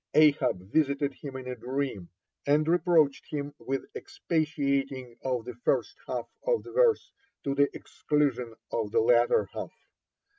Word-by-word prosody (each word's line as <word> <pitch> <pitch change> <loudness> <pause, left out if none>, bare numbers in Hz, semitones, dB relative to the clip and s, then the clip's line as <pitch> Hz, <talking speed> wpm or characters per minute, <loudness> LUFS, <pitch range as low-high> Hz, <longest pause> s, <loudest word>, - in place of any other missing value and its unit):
Ahab 140 -11 +4
visited 140 -2 +2
him 135 0 -9
in 130 -1 -6
a 125 - -3
dream, 125 -6 -3 0.4
and 150 +2 +3
reproached 165 -4 +3
him 145 -1 -4
with 135 +1 -3
expatiating 140 -6 -1
on 125 -3 -1
the 125 +2 -7
first 120 - 0
half - - -3
of - - +1
the - - -10
verse 485 -3 +3 0.3
to 140 - 0
the 140 0 +3
exclusion 135 -6 -1 0.2
of 110 -3 -1
the - - +2
latter 120 -3 +4
half. - - -4
140 Hz, 145 wpm, -29 LUFS, 125-150 Hz, 0.4 s, Ahab